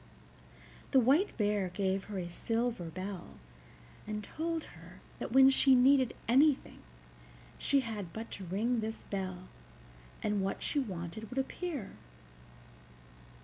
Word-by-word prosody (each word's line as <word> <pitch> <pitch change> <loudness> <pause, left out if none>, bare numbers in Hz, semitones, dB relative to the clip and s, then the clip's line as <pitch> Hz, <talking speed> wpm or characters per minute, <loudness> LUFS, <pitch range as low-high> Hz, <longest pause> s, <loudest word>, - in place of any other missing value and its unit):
The 270 - +5
White 280 - +3
Bear 205 -3 +1
gave 190 +1 -1
her 205 -2 -6
a 180 -2 -3
silver 225 +2 -2
bell, 185 - -6 0.7
and 210 0 -3
told 325 +6 -3
her - - -14 0.2
that - - -4
when 265 +2 +8
she 270 0 +5
needed 260 0 +4
anything 275 +4 +3 0.8
she 280 -1 +3
had 210 -7 -5
but 225 +5 -7
to 195 - -7
ring 220 +7 0
this 220 0 -4
bell, 185 -2 -4 0.8
and 210 -1 +1
what 195 0 -2
she 290 - +1
wanted 200 -2 -5
would 255 - -8
appear. 275 - -3
220 Hz, 130 wpm, -32 LUFS, 190-265 Hz, 0.8 s, when